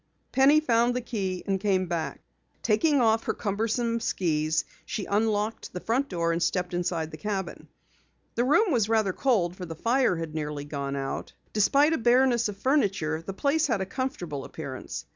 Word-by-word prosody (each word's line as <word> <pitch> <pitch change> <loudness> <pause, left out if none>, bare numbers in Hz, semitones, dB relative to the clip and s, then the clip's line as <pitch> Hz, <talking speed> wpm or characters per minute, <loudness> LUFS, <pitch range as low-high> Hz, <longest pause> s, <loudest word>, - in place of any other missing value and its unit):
Penny 275 +4 +6
found 240 -3 +2
the 250 - -1
key 195 -6 -3
and 195 -1 0
came 190 -2 +1
back. 170 -2 -3 0.4
Taking 275 +7 +3
off 225 -2 +3
her - - -1
cumbersome 230 +3 -1
skis, 160 -7 0 0.2
she 205 - -4
unlocked 210 +1 -1
the 180 - -4
front 255 +8 0
door 170 -2 0
and 165 +1 -1
stepped 180 0 0
inside 170 -2 -1
the 155 - -8
cabin. 195 -1 -4 0.7
The 235 - +1
room 340 - +4
was 225 -6 +2
rather 215 -4 +2
cold 195 -10 +1
for 185 - -6
the 165 - -6
fire 235 - +2
had 165 -2 -5
nearly 150 -2 -4
gone 140 -1 -4
out. 135 -1 -4 0.2
Despite 280 +9 +4
a 320 - 0
bareness 240 -1 +3
of 200 - -7
furniture, 195 - +1
the 195 +4 -6
place 290 +9 +1
had 230 -7 0
a 190 - -1
comfortable 185 - -4
appearance. 140 -4 -7
205 Hz, 180 wpm, -27 LUFS, 170-240 Hz, 0.7 s, Penny